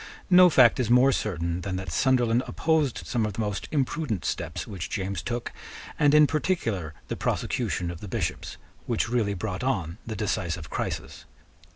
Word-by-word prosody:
No 180 0 +8
fact 130 -7 +5
is 120 -4 0
more 125 +3 +6
certain 85 - -2
than 95 +1 -3
that 95 -2 -5
Sunderland 125 +2 +2
opposed 155 -6 0
some 120 -3 0
of 105 -1 -2
the 100 - -7
most 105 -2 -3
imprudent 140 - -1
steps - - -3
which 95 -4 -6
James 95 -3 -3
took, 120 +7 -4 0.5
and 145 0 +5
in 150 0 +8
particular 115 - -1
the - - -3
prosecution 85 -1 -1
of 85 - -9
the 105 - -7
Bishops, - - -3 0.3
which - - 0
really 110 -5 0
brought 95 +2 -4
on 95 -8 -1
the 110 - -4
decisive 90 -6 -2
crisis. - - -4
110 Hz, 170 wpm, -26 LUFS, 95-130 Hz, 0.5 s, No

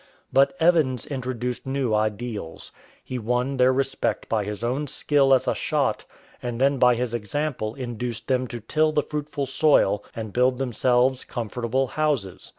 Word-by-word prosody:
But 135 +3 +4
Evans 160 -7 +3
introduced 125 -2 -4
new 130 -4 0
ideals. 105 -4 -3 0.3
He 130 - -5
won 125 +4 -1
their 130 0 +5
respect 135 +1 -1
by 110 -3 0
his 105 +2 -5
own 130 +5 -1
skill 140 -1 +2
as 130 - +4
a - - +3
shot, - - -1 0.4
and 120 -1 -4
then 135 0 +3
by 125 -1 +5
his 120 0 -2
example 120 0 -2
induced 120 -3 -5
them 130 -1 +1
to 120 -1 -7
till 155 +8 +1
the 150 -1 +1
fruitful 150 -2 -3
soil 130 -7 +3
and 110 -3 -6
build 125 +1 +3
themselves 125 0 +1
comfortable 120 +2 -2
houses. 135 -9 -2
125 Hz, 155 wpm, -24 LUFS, 115-135 Hz, 0.4 s, their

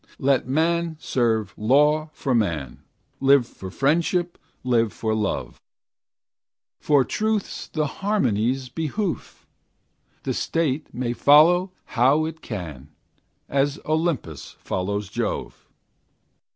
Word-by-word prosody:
Let 135 -2 +1
man 165 +3 0
serve 110 -8 0
law 150 +7 +3
for 135 - -2
man; 80 - -1 0.4
Live 135 -2 +5
for 95 -5 -10
friendship, 170 - 0 0.2
live 115 -3 +2
for 110 -1 -2
love, 105 -2 -2 1.2
For 145 -4 +3
truth's 215 -2 -2
and 155 -1 +1
harmony's 135 - 0
behoof; 165 - -4 0.8
The - - -1
state 155 -3 -1
may 120 -1 -2
follow 170 +8 +5
how 135 +6 +3
it 160 0 -6
can, 80 - -7 0.6
As 140 +1 0
Olympus 155 - -2
follows 100 +2 -3
Jove. 100 - -4
135 Hz, 100 wpm, -23 LUFS, 110-160 Hz, 1.2 s, Live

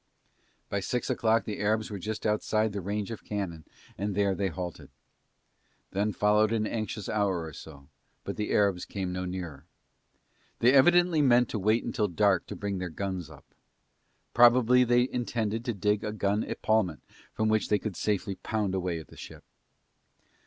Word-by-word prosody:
By 100 - -2
six 120 +5 -2
o'clock 115 0 +2
the 105 - -5
Arabs 110 +1 0
were 100 - -5
just 110 +3 -5
outside 110 0 +1
the 100 - -3
range 100 +3 -3
of 115 - -7
cannon 90 -7 -4 0.3
and 100 0 -2
there 100 -1 +2
they 100 +1 -1
halted. 90 -1 -6 1.0
Then 100 +2 0
followed 105 +1 +3
an 110 -1 +1
anxious 110 -2 -4
hour 100 -5 0
or 80 -2 -8
so, 70 -2 -12 0.4
but - - -5
the 105 - -3
Arabs 100 -4 +2
came 95 -2 -4
no 90 0 -3
nearer. 85 -5 -6 0.9
They 125 +3 +4
evidently 175 +3 +5
meant 125 -3 +4
to 110 - -3
wait 110 +4 +2
till 105 -3 +1
dark 95 0 +2
to - - -6
bring 100 -2 -3
their 90 -1 -3
guns 95 -2 -4
up. - - -15 0.9
Probably 120 +1 +6
they 120 +1 +3
intended 115 -3 -2
to 120 - -1
dig 105 +1 0
a 105 - -2
gun 105 0 0
epaulment 110 -7 0 0.3
from 110 - -1
which 110 0 +1
they 105 - +4
could 105 -3 -5
safely 100 +1 -1
pound 105 0 -2
away 90 -2 -1
at 80 -4 -10
the - - -14
ship. - - -10
105 Hz, 175 wpm, -28 LUFS, 95-110 Hz, 1.0 s, Probably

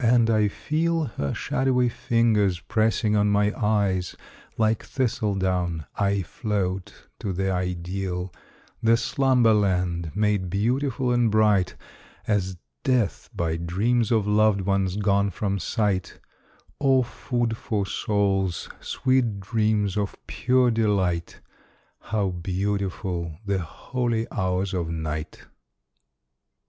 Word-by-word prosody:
And 115 -1 +4
I 110 -1 +3
feel 165 +9 0
Her 70 - -3
shadowy 130 -2 +1
fingers 110 -6 +2
pressing 110 +4 +1
on 105 0 +3
my 105 +1 +2
eyes: 100 -5 0 0.4
Like 110 -1 +1
thistledown 95 - -1
I 100 -1 +1
float 95 0 -3
to 100 - -3
the 95 +1 -1
Ideal 90 0 -3 0.5
The 115 +1 +4
Slumberland, 100 - +2
made 105 -3 +1
beautiful 125 +6 0
and 120 -2 +3
bright 105 -3 +3 0.5
As 95 -4 0 0.3
death, 125 -6 0
by 80 -1 -1
dreams 105 +8 0
of 110 -3 +3
loved 105 -1 +3
ones 95 -1 0
gone 100 -1 +2
from 100 +1 -2
sight, 95 0 -1 0.6
O 135 -2 +4
food 120 -1 -2
for 105 -3 -2
soul's, 95 -3 0
sweet 125 -6 0
dreams 105 0 0
of 100 -1 -1
pure 125 -1 +2
delight, 100 -7 0 0.6
How 105 -3 -1
beautiful 90 -2 -2
the 100 -1 0
holy 115 - -2
hours 95 -1 -1
of 85 -3 -1
Night! 80 -1 -4
100 Hz, 110 wpm, -25 LUFS, 95-115 Hz, 0.6 s, And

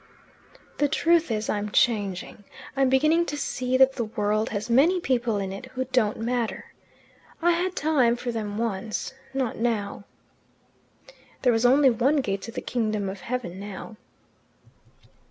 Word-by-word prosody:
"The 290 - +4
truth 335 +2 +2
is, 215 -1 -1
I'm 210 0 -1
changing. 205 -3 0 0.3
I'm 270 -1 +3
beginning 310 +6 +3
to 295 - -3
see 255 -2 -1
that 265 0 +6
the 235 -4 -2
world 215 0 -1
has 205 -1 -3
many 290 +10 +4
people 240 -8 0
in 195 -1 -3
it 200 +6 -8
who 260 0 -4
don't 250 -5 +1
matter. 235 0 -3 0.7
I 345 +1 +3
had 360 +2 0
time 275 -6 +2
for 240 0 -4
them 210 -3 -4
once. 220 +1 -3 0.2
Not 265 -4 -2
now." 215 -4 -2 1.4
There 250 -2 +4
was 225 +2 +3
only 270 +1 +5
one 250 +6 +2
gate 200 -9 -1
to 230 - -7
the 245 - -5
kingdom 215 -4 -1
of 190 -1 -7
heaven 230 -7 -4
now. 205 +2 -8
235 Hz, 155 wpm, -25 LUFS, 210-265 Hz, 1.4 s, that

